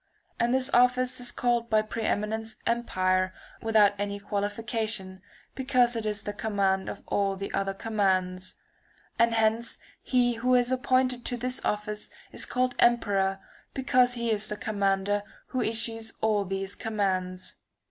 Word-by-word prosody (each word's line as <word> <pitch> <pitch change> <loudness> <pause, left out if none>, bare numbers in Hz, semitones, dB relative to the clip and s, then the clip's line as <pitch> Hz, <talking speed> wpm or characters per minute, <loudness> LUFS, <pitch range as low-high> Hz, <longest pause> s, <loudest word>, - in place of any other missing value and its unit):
And 235 +1 +2
this 260 +1 +1
office 250 +1 +4
[^703 - - -5
is 245 - 0
called 240 -1 0
by 215 -1 +3
pre 220 +1 -5
eminence 220 +1 -1
empire, 185 -5 +1 0.3
without 215 -3 +4
any 200 0 -2
qualification, 205 -1 -2 0.3
because 255 -2 +2
it 225 -1 -2
is 210 -1 -2
the 205 - -4
command 200 -3 0
of - - -7
all 200 -1 0
the 195 +1 -6
other 195 0 -1
commands. 190 -4 0 0.6
And 230 0 +4
hence 225 +1 +1 0.2
he 245 -2 +2
who 250 +2 +3
is 245 0 +3
appointed 255 -1 +1
to 245 - -2
this 255 +1 -2
office 210 0 -2 0.2
is - - -2
called 255 0 0
emperor 195 -5 +3 0.3
because 250 -2 +3
he 235 -1 -1
is 215 -1 0
the 210 - -4
commander 205 -3 0 0.3
who 255 - -1
issues 225 0 0
all 210 -2 +1
the 195 +1 -3
commands. 185 -4 -2
220 Hz, 150 wpm, -28 LUFS, 200-240 Hz, 0.6 s, office